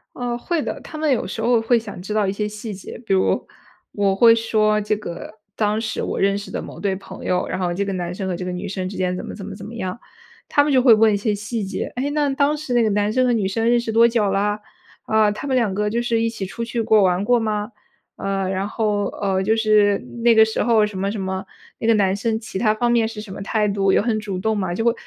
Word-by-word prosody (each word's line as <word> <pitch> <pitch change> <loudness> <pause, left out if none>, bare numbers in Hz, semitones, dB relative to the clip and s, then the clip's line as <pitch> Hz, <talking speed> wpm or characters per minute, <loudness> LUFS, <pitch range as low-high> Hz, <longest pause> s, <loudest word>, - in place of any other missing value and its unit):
啊， 245 -1 -2
会 330 +5 -2
的。 - - -4
他 310 - -9
们 310 -1 +1
有 245 - 0
时 - - -5
候 235 0 +3
会 235 +2 +3
想 210 -5 -8
知 210 +3 -5
道 210 -2 +2
一 190 - 0
些 210 +1 -2
细 210 +1 -7
节， 185 - -9
比 - - 0
如 190 - +2 0.5
我 200 -2 +1
会 230 +2 +7
说 215 -2 +2
这 210 +1 0
个， 210 +1 -8 0.2
当 210 0 0
时 220 -1 -3
我 - - -3
认 195 0 +2
识 205 - -7
的 - - -3
某 - - -10
对 200 -2 0
朋 195 - -10
友， 180 0 0
然 - - -3
后 180 -2 -1
这 200 - -1
个 195 - -3
男 175 -1 -3
生 190 +1 -4
和 180 - -2
这 180 - -5
个 180 - -3
女 180 - -5
生 185 -1 -3
之 195 - -8
间 180 -1 -1
怎 - - -6
么 - - -7
怎 200 - -8
么 200 - -7
怎 200 - -10
么 230 - -9
样。 185 0 -4 0.5
他 290 - +4
们 295 - 0
就 260 - +5
会 245 -3 +7
问 220 0 +4
一 - - +2
些 210 +1 0
细 210 +2 -4
节： 195 - -4
“诶， 265 +3 -1
那 295 0 +1
当 285 +2 +1
时 295 -4 -5
那 240 -1 +4
个 220 - +2
男 205 +1 +1
生 255 +1 +2
和 245 - +3
女 210 -4 0
生 225 +4 0
认 240 - +4
识 235 -2 -3
多 230 +1 +6
久 225 -4 +1
啦？ 205 +1 0 0.4
啊， 215 -1 +3
他 210 +6 -5
们 265 - 0
两 225 -6 +1
个 210 +1 0
就 235 +2 0
是 235 -1 0
一 230 - +1
起 210 -4 -5
出 230 +5 -5
去 230 0 -3
过， 220 -2 +4
玩 185 0 +2
过 245 +2 +3
吗？” 215 0 -2 0.4
呃， 195 -1 -2
然 190 +1 -1
后， 210 -1 0 0.2
呃， 195 -2 +1
就 220 +3 +2
是 210 -2 +3 0.3
那 235 - +6
个 220 - +7
时 220 - -3
候 225 -3 +4
什 200 -3 -7
么 200 +2 -1
什 215 - -4
么， 190 0 -3 0.3
“那 225 - -3
个 230 - +5
男 195 -2 +2
生 220 +2 -1
其 220 -4 -6
它 215 0 +2
方 240 +2 0
面 235 -2 +3
是 220 -1 -6
什 210 -2 -10
么 195 - -7
态 210 +1 0
度， 195 -1 +1
有 - - +4
很 220 -1 0
主 200 -3 -4
动 220 +3 0
吗？” 185 -3 -2
就 225 - -2
会 235 - +5
215 Hz, 305 characters per minute, -21 LUFS, 195-230 Hz, 0.5 s, 会